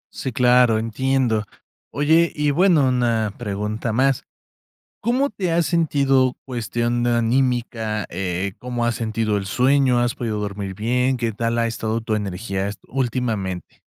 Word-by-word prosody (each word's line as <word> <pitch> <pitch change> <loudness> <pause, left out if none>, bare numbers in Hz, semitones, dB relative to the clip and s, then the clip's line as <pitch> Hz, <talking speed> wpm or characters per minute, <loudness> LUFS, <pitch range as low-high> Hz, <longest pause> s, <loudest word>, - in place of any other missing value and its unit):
Sí, 130 - -3
claro, 125 -1 +4
entiendo. 115 0 0 0.5
Oye, 160 +4 +3
y 150 -1 +1
bueno, 160 -3 +4
una 115 -4 +1
pregunta 105 +1 -3
más, 135 +2 +2 0.8
¿cómo 255 +5 +1
te 190 -4 -3
has 170 0 +2
sentido 140 -6 +2
cuestión 120 0 -1
anímica? 120 -3 0
Eh, 90 +1 -2
¿cómo 120 -1 -3
has 120 -1 0
sentido 110 -2 -1
el 95 - -3
sueño? 130 +3 +3
¿Has 120 0 +1
podido 110 -3 -3
dormir 100 -1 -4
bien? 125 +5 +1
¿Qué 115 -2 -1
tal 115 +2 -1
ha 115 0 +2
estado 115 0 -2
tu 110 -1 -1
energía 100 -1 -3
esto 100 - -8
últimamente? 115 -8 -2
120 Hz, 140 wpm, -22 LUFS, 110-130 Hz, 0.8 s, claro